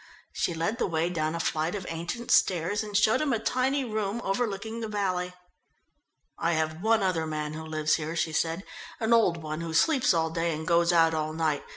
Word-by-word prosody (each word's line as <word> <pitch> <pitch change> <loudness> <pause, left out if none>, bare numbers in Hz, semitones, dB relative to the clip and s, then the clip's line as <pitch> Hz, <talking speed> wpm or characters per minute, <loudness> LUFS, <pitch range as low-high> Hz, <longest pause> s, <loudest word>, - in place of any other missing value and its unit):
She 170 - -1
led 165 +8 -1
the - - +1
way 165 0 0
down 155 -1 -1
a - - -3
flight 160 +2 -1
of 195 -3 -5
ancient 175 +9 -4
stairs 185 +3 +3
and 210 -2 -1
showed 225 +6 +3
him 300 -3 0
a - - +2
tiny 255 +4 0
room 215 -1 -2
overlooking 220 +2 -2
the 225 - -3
valley. 185 -4 -1 1.1
"I 170 - +1
have 160 +1 -1
one 220 0 +3
other 165 -4 0
man 150 -1 -3
who 160 +1 -6
lives 155 -1 0
here," 160 +1 -4
she 160 -1 -1
said. 165 +4 0 0.4
"An 225 +1 +2
old 180 -8 +3
one, 155 +1 -4
who 165 -1 -4
sleeps 270 - +4
all 160 -2 +1
day 165 0 -1
and 160 +1 -6
goes 170 0 +3
out 165 -1 +4
all 155 0 -2
night. 155 -3 0
170 Hz, 210 wpm, -28 LUFS, 160-215 Hz, 1.1 s, sleeps